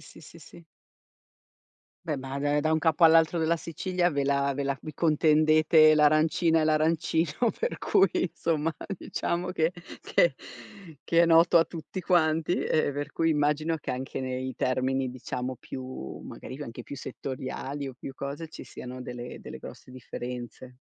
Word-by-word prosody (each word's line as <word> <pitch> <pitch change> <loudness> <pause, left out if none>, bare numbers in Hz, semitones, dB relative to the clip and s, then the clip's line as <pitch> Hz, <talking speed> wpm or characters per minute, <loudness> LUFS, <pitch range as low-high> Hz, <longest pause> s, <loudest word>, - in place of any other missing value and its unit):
sì, 155 - -15
sì, 165 +2 -14
sì. 170 +2 -15 1.4
Beh, 155 - -1
ba 135 +1 -5 0.2
da 155 +1 +1
un 160 - +3
capo 160 +1 +3
all'altro 165 +1 +5
della 165 +1 +2
Sicilia 175 +2 -1
ve 140 -1 -1
la 140 0 +1
ve 140 +1 -2
la 140 -1 -1
vi 155 - -7
contendete 155 0 +5
l'arancina 155 +2 +3
e - - +2
l'arancino, 160 +5 +1
per 485 +2 -2
cui 190 - +3
insomma, 165 -2 -1 0.2
diciamo 180 +1 -3
che 165 -1 +1 0.3
che - - +3 0.7
che 170 0 +4
è - - +4
noto 165 +1 +6
a 165 - +4
tutti 170 +3 -7
quanti, 165 -2 +2
ehm, 155 -2 +1
per 145 +1 -5
cui 165 0 +1
immagino 150 +2 +1
che 150 - -5
anche 130 +1 -5
nei 130 0 -3
termini, 130 0 0
diciamo 125 0 -5
più 130 - -7
magari 130 - -9
anche 120 -3 -7
più 140 - -8
settoriali, 135 +1 -5
o 135 - -7
più 135 - -8
cose 140 +4 -6
ci - - -10
siano 130 0 -9
delle 125 -1 -7
delle - - -9
grosse 130 - -11
differenze. 125 0 -8
155 Hz, 160 wpm, -27 LUFS, 135-165 Hz, 1.4 s, noto